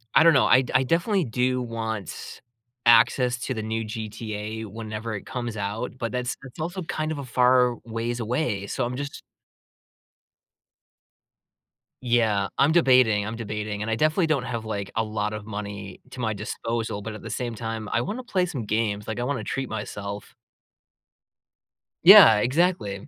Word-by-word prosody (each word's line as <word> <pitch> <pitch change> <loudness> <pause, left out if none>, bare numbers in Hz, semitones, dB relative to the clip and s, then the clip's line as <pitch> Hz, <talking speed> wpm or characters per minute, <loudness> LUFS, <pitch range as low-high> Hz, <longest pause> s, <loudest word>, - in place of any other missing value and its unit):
I - - +7
don't 165 - +7
know. 135 - +4
I 130 - +6
d 125 - -6
I 130 - +5
definitely 175 - +1
do 125 +1 0
want 110 -5 -5 0.4
access 120 +2 +5
to 130 +1 -3
the 110 -3 -4
new 110 +1 -2
GTA 110 0 -5
whenever 110 +1 -6
it 100 - -7
comes 120 -3 -5
out, 105 +5 -4
but 115 -3 -3
that's 125 0 -2
that's 135 +3 -12
also 175 +4 -3
kind 155 -1 -3
of 155 - -3
a 140 - -5
far 125 0 +3
ways 115 +1 -3
away. 115 -4 -1
So 130 +4 -2
I'm 125 - -4
just 140 +2 -6 2.8
Yeah, 110 -5 +2
I'm 145 +3 +4
debating, 125 -10 +4
I'm 110 +2 -5
debating. 105 -2 -4
And 105 - -3
I 110 - +1
definitely 155 +6 +2
don't 150 -5 +1
have, 115 -3 -4
like, 100 -2 -4
a 115 - +2
lot 105 -1 -2
of 105 -1 -6
money 100 -2 -7
to 130 - -11
my 110 -3 0
disposal, 110 +1 -4
but 110 +1 -6
at 105 - -9
the 115 - -8
same 120 +1 -3
time, 115 -1 -5
I 120 - +2
wanna 230 - -5
play 185 -6 +1
some 140 -11 -5
games. 105 -1 -1
Like, 110 +2 -3
I - - -1
wanna 125 -5 -2
treat 135 +2 -3
myself. 100 -1 -6 1.7
Yeah, - - +10
exactly. 125 - 0
115 Hz, 170 wpm, -25 LUFS, 105-130 Hz, 2.8 s, Yeah